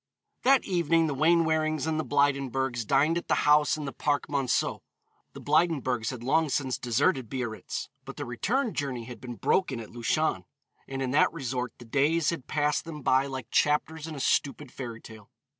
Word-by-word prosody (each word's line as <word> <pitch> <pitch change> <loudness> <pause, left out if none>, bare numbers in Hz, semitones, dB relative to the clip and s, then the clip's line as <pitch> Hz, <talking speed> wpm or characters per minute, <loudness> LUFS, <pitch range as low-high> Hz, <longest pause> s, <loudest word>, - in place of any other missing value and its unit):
That 270 +1 +4
evening 165 -3 +2
the 150 - -1
Wainwarings 155 -1 +2
and 160 -1 -1
the - - 0
Blydenburgs 135 -5 0
dined 150 +5 +3
at - - -14
the - - +1
house 150 0 +4
in 150 - -5
the 135 - -5
Parc 145 -1 -1
Monceau. 140 -4 0 0.5
The - - -9
Blydenburgs 130 -9 +1
had 125 -3 -6
long 155 +4 +2
since 130 -2 -1
deserted 125 - +1
Biarritz, 120 -4 -4 0.2
but - - -10
the - - -4
return 225 - -1
journey 135 -5 -3
had 115 -2 -10
been 120 -2 -7
broken 145 -2 +1
at 110 - -9
Luchon, 120 +7 0 0.4
and 135 0 -3
in 130 - -2
that 145 - +4
resort 125 -5 -3
the 120 - -12
days 150 +7 +2
had 165 -7 -6
passed 150 -1 0
them 155 -4 -8
by 130 +2 +3
like 130 -4 -7
chapters 150 +1 +1
in 160 - -6
a - - -6
stupid 140 0 0
fairy 120 -4 -7
tale. 110 -2 -13
140 Hz, 185 wpm, -28 LUFS, 125-155 Hz, 0.5 s, That